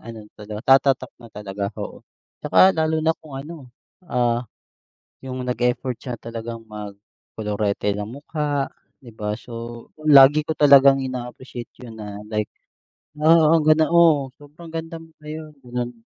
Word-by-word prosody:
ano 115 -2 -10
talaga, 105 +5 +3
tatatak 135 -1 0
na 115 - -12
talaga, 100 -1 -4
oo. - - -7 0.4
'Tsaka 190 - +6
lalo 160 0 +1
na 160 - +4
kung 150 -4 -10
ano, 150 -2 -10 0.4
ah, 120 -2 +1 0.8
yung 130 -1 -6
nag 125 0 -2
effort 125 +1 -2
siya 125 -3 -5
talagang 115 0 -7
mag 105 -2 -8 0.4
kolorete 105 -1 -1
ng 105 - -3
mukha, 145 +2 -3 0.4
'di 120 - -12
ba? 105 -1 -3
So, 115 0 -9 0.2
lagi 145 +1 +8
ko - - -1
talagang 140 -1 +6
ina-appreciate 125 -1 -7
'yon 115 -2 -10
na, 105 -1 -7
like, 105 -1 -1 0.7
"Wow 160 +1 +5
ang 160 - +1
ganda 155 0 +5
mo, 160 -5 +5
sobrang 150 +4 -13
ganda 165 0 -5
mo 165 - -14 0.2
ngayon." 155 0 -7
Gano'n. 120 -1 -5
130 Hz, 150 wpm, -22 LUFS, 115-150 Hz, 0.8 s, lagi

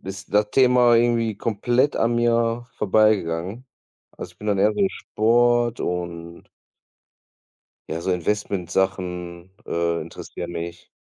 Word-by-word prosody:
ist 95 +1 -8
das 105 0 +2
Thema 125 -2 +5
irgendwie 115 -1 +2
komplett 120 +5 0
an 115 +1 +1
mir 120 0 +1
vorbeigegangen. 105 +1 +1 0.5
Also, - - -8
ich - - -34
bin 105 - -8
dann 100 -1 +1
eher 105 +2 +3
so 195 - +2
Sport 120 0 +1
und 85 -1 -5 1.4
ja, 80 - -3
so 95 - -2
Investment-Sachen, 90 -2 -2 0.2
äh, 85 0 -1
interessieren 85 +2 -8
mich. 85 0 -7
105 Hz, 120 wpm, -23 LUFS, 85-120 Hz, 1.4 s, Thema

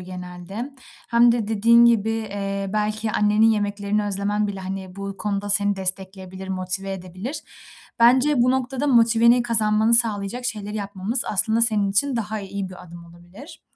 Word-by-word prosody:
genelde 180 +6 -8 0.4
hem 235 0 +5
de 225 -3 -2
dediğin 230 +2 +5
gibi, 225 -2 +3
eee, 200 -3 -4
belki 215 +1 -1
annenin 210 +2 +3
yemeklerini 205 0 -1
özlemen 205 +1 -1
bile, 195 -1 -6
hani, 190 0 -7
bu 200 0 -6
konuda 205 0 -3
seni 205 0 +2
destekleyebilir, 190 0 -6
motive 190 +1 -2
edebilir. 185 - -7 0.6
Bence 255 +3 +4
bu 255 - +3
noktada 265 +2 -1
motiveni 235 -1 +4
kazanmanı 220 -1 +2
sağlayacak 230 0 0
şeyleri 210 -3 -4
yapmamız 200 +4 -2
aslında 220 +3 +1
senin 210 -4 +2
için 250 +6 +1
daha 215 -1 -3
iyi 195 -1 -5
bir 185 -1 -12
adım 170 0 -12
olabilir. 175 - -15
205 Hz, 150 wpm, -22 LUFS, 195-230 Hz, 0.6 s, hem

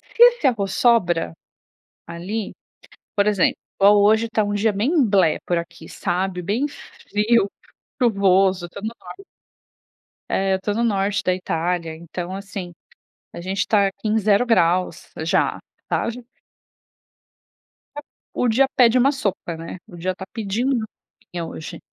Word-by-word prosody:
Se 470 - +7
esse 485 - +5
arroz 200 -6 0
sobra, 175 - +2 0.7
ali, 195 +6 -5 0.6
por 200 -1 +2
exemplo, 205 -4 +2 0.2
igual 205 +1 +6
hoje 220 +2 +4
tá 220 -1 +1
dia 210 +1 +2
bem 265 - +2
blé, 195 -7 +3
por 175 - +1
aqui, 170 -1 -8
sabe, 180 0 -2
bem 215 +10 0
frio, 210 -5 -1 0.5
chuvoso. 195 -5 +3
Eu - - -11
to 200 - -9
no 215 - -3
nor 395 - -11 1.1
é, 195 0 +1
eu 190 - 0
tô 205 - -1
no 230 +3 0
norte 200 -2 0
da 185 - +2
Itália. 170 -2 -2
Então, 175 +3 -6
assim, 195 -2 -7 0.6
a - - -8
gente 190 +2 -2
tá 200 -2 +3
aqui 195 +3 -6
em 220 +1 +2
0 210 +2 +3
graus, 180 -6 +1
já, 165 - +1 0.3
tá - - 0
já... 245 +2 -9 1.8
É - - -4 0.3
o 250 - 0
dia 260 +4 +4
pede 245 -1 +5
uma 265 +3 +4
sopa, 200 - -3
né, 165 +2 -7
o 180 - -12
dia 185 +2 -2
tá 190 - -8
pedindo 225 +5 -1
uma 225 -3 -1 0.4
sopinha 175 -2 -6
hoje. 160 -1 -8
200 Hz, 155 wpm, -22 LUFS, 180-225 Hz, 1.8 s, Se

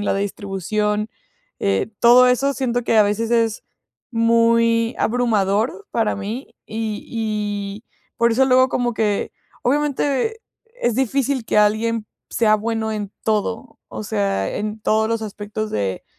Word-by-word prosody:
la 205 - 0
distribución, 205 +2 -2 0.5
eh, 100 - 0
todo 250 +1 +7
eso 275 +3 +2
siento 245 -2 -1
que 225 - +2
a - - +8
veces 215 +3 -1
es 230 -2 +1 0.5
muy 230 0 +3
abrumador 230 - +1
para 225 -2 0
mí, 215 +7 -6
y 215 -1 -4
y 210 -2 -3 0.3
por 235 0 +3
eso 260 +4 +4
luego 255 0 +4
como 240 -1 -1
que, 210 -2 0 0.3
obviamente, 290 - 0 0.4
es 240 - +1
difícil 265 0 0
que 210 - +1
alguien 220 +1 +2 0.2
sea 215 -2 +3
bueno 220 0 -1
en 205 -2 -4
todo, 210 - -2
o 110 -1 -6
sea, 100 -2 -1
en 215 +1 -4
todos 220 +1 +1
los 230 -1 -1
aspectos 215 +1 -5
de 100 -2 -2
220 Hz, 135 wpm, -21 LUFS, 210-240 Hz, 0.5 s, a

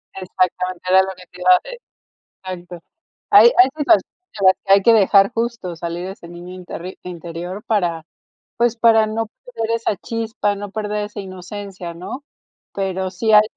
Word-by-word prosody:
Exactamente, 185 -1 -2
era 190 +1 +6
lo 190 - -4
que 180 0 -14
te 180 - -15
iba 180 - +2
a - - +2
de - - -9 0.8
exacto. 175 0 -11 0.5
Hay 225 +4 +8
hay 250 +2 +7
situa 310 +3 +5
en 315 - -7
las 190 - +6
que 195 - +5
hay 200 - +6
que 230 +4 +5
dejar 200 -1 +5
justo 230 -6 -3
salir 170 +2 -5
ese 190 -3 -9
niño 175 +1 -10
interri 185 0 -8
interior 175 +2 -7
para, 175 -7 0 0.5
pues, 235 0 +1
para 225 -1 +5
no 225 +1 -2
perder 230 0 -6
esa 230 -3 -2
chispa, 225 0 -2
no 205 0 -7
perder 210 0 -3
esa 210 0 -8
inocencia, 185 -1 -8
¿no? 195 - -8 0.5
Pero 190 -1 -2
sí 205 +4 0
hay 210 0 +9
195 Hz, 170 wpm, -20 LUFS, 180-225 Hz, 0.8 s, hay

